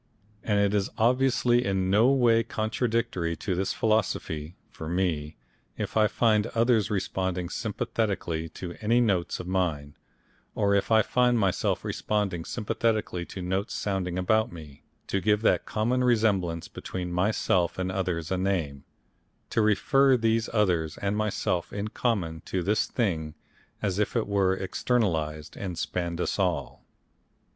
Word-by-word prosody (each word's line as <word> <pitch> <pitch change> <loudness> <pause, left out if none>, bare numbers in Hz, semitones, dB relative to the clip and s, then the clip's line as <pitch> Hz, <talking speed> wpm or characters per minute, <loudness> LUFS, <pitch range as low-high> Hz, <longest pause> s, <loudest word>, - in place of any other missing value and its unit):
And 105 -2 0
it 100 0 +2
is 100 -2 +1
obviously 125 0 +3
in 95 -3 0
no 110 +5 +5
way 120 -4 +4
contradictory 110 -5 -1
to 95 - -3
this 95 +2 -1
philosophy, 90 -7 -1 0.2
for 80 - -7
me, 80 -4 -1 0.4
if - - -4
I 110 -1 +5
find 110 -2 +2
others 115 -3 +3
responding 95 -3 -2
sympathetically 100 -7 -2
to 85 +2 -7
any 115 +3 +3
notes 100 -8 +1
of - - -6
mine 85 -6 -1 0.6
or 100 -2 +2
if 100 - +1
I 110 -1 +5
find 125 +1 +2
myself 100 -4 0
responding 100 -6 -1
sympathetically 110 -5 -1
to 95 - -7
notes 95 +4 -2
sounding 95 -3 -2
about 110 +5 +2
me, 75 -5 -11 0.2
to 100 - -1
give 105 +1 +2
that - - +2
common 120 +4 0
resemblance 100 -9 +1
between 90 -1 -6
myself 90 -2 +1
and 95 0 -2
others 90 -3 -2
a 95 - 0
name, 85 -8 -1 0.7
to 115 - +2
refer 130 +5 +4
these 115 -1 +1
others 90 -8 +1
and 100 +1 -1
myself 105 -4 -1
in 105 +1 -3
common 95 -10 -1
to 90 -2 -2
this 105 +4 +1
thing 80 -10 -1 0.5
as 100 -1 0
if 105 - 0
it 115 - +1
were 95 -2 +1
externalised 80 -8 -1
and 90 -4 -5
spanned 85 +2 -3
us 90 - -1
all. 85 -9 -1
100 Hz, 145 wpm, -27 LUFS, 90-110 Hz, 0.7 s, no